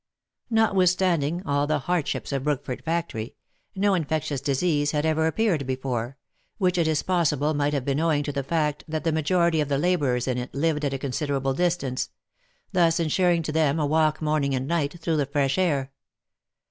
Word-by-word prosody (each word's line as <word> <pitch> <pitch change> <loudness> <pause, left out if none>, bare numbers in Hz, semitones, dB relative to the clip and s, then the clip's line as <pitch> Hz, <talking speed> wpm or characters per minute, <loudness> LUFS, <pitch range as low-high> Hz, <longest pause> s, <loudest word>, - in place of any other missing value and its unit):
Notwithstanding 185 -6 +2
all 145 -1 +1
the 155 0 +1
hardships 165 +1 -2
of 135 -1 -1
Brookford 145 -3 -2
factory, 160 -9 -3 0.4
no 200 +1 +2
infec 160 -4 0
tious 140 -3 -3
disease 145 +1 +1
had 150 0 0
ever 160 0 +2
appeared 165 - 0
there, 125 0 -3 0.4
which 180 -4 +1
it 165 - +2
is 155 -2 +1
possible 155 -5 +1
might 145 0 0
have 135 -3 -2
been 140 0 0
owing 160 -3 +2
to 145 - -3
the 140 -1 -2
fact 150 +1 -1
that 155 0 -3
the 165 - +1
majority 165 +1 +2
of 145 - -2
the 140 - +1
labourers 145 -7 +1
in 125 -1 0
it 125 +2 -7
lived 150 +1 0
at 140 -2 0
a - - -1
considerable 135 0 -1
distance, 150 -6 -1 0.6
thus 170 -3 +3
insuring 170 +1 +2
to 155 - -3
them 155 -1 +2
a 150 - +1
walk 155 +1 +1
morning 150 -3 +1
and 130 +1 -2
night, 170 0 -1
through 165 -1 0
the 145 -2 0
fresh 140 +3 0
air. 140 -7 0
150 Hz, 185 wpm, -25 LUFS, 140-170 Hz, 0.6 s, thus